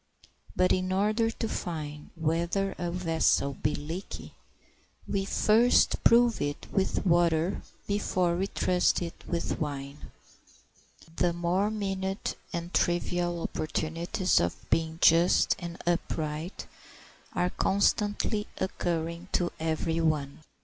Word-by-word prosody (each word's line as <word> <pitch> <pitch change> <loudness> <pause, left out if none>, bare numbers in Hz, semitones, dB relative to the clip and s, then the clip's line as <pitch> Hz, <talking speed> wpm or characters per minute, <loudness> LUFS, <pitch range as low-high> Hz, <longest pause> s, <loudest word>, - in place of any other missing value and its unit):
But 185 0 +3
in 185 0 0
order 215 +4 +2
to 225 0 -3
find 150 -7 -5
whether 170 +4 0
a 175 - -1
vessel 165 -5 +1
be 150 +3 -1
leaky 165 +6 -6 0.7
we 195 -1 -1
first 225 +5 +3
prove 235 -1 +5
it 145 0 -3
with 195 +1 0
water 170 0 +2 0.2
before 185 -4 0
we 190 +3 0
trust 180 -2 +1
it 170 - -5
with 170 -1 -2
wine. 140 -1 -5 1.1
The 175 -1 +2
more 175 +4 +1
minute 195 -2 -2 0.2
and 170 0 -5
trivial 175 0 0
opportunities 165 +4 0
of 85 - -2
being 160 0 +1
just 170 +2 +5
and 170 -1 -6
upright 160 -1 -2 0.7
are 180 0 0
constantly 205 +1 +1
occurring 170 -1 -2
to 175 -1 +1
every 160 +1 -1
one. 150 -4 0
175 Hz, 115 wpm, -29 LUFS, 160-190 Hz, 1.1 s, prove